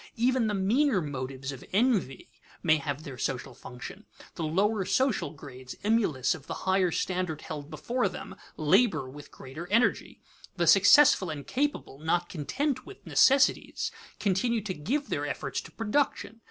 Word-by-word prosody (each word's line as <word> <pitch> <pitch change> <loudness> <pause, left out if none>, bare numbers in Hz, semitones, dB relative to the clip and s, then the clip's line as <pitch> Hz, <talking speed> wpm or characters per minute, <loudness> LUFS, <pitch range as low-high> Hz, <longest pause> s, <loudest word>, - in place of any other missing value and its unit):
Even 245 0 +2
the 210 - -1
meaner 220 +5 +2
motives 135 -3 -5
of 135 - -9
envy 200 - +1 0.4
may 155 -2 +4
have 145 0 -4
their 135 -5 -9
social 130 0 -3
function. 125 - -10 0.3
The - - -7
lower 195 +6 +1
social 260 - +1
grades, 130 -3 -10
emulous 205 - +2
of 160 -4 -11
the - - -6
higher 190 -1 +3
standard 180 -2 -2
held 150 -2 -7
before 245 +7 -1
them, - - -8 0.2
labor 155 - +3
with 145 +3 -11
greater 155 +7 -9
energy. 230 +6 +1 0.4
The - - +2
successful 285 - +6
and 145 -3 -6
capable, 285 - -2
not 170 +3 0
content 255 - -2
with 395 +3 -13
necessities, 270 0 +3 0.3
continue 215 +4 +1
to 200 -2 -4
give 245 - -2
their - - -2
efforts - - -3
to - - -13
production. 225 0 -1
185 Hz, 155 wpm, -28 LUFS, 145-235 Hz, 0.4 s, successful